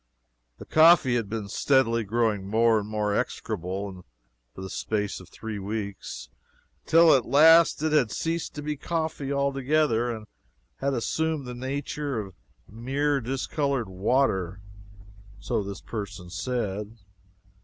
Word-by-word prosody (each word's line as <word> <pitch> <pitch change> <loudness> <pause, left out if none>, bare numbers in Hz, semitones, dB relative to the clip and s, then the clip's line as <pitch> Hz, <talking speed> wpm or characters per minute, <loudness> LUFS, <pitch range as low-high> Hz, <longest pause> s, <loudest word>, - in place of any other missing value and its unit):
The - - -10
coffee 155 -5 +6
had 115 -4 -1
been 110 -2 -4
steadily 115 0 +2
growing 105 -2 0
more 115 +1 +4
and 105 0 -6
more 105 -1 -1
execrable 95 -4 -3 0.5
for - - -8
the 95 - -5
space 105 -2 -2
of 90 -2 -14
three 110 -2 -6
weeks, 100 - -5 0.6
till 165 0 +7
at 130 -4 +2
last 160 +3 +6
it 155 - +1
had 145 -7 +3
ceased 165 +8 -3
to 150 - -6
be 150 0 -2
coffee 160 -3 -3
altogether 140 -3 +1
and 110 -2 -5 0.5
had 140 0 -1
assumed 155 +4 -1
the 125 - -6
nature 135 +1 -3
of 100 -3 -7 0.3
mere 135 +6 -1
discolored 135 -1 -2
water 95 -2 0 0.8
so - - -1
this 100 -1 -7
person 100 -5 -7
said. 105 -2 -3
120 Hz, 135 wpm, -26 LUFS, 105-140 Hz, 0.8 s, till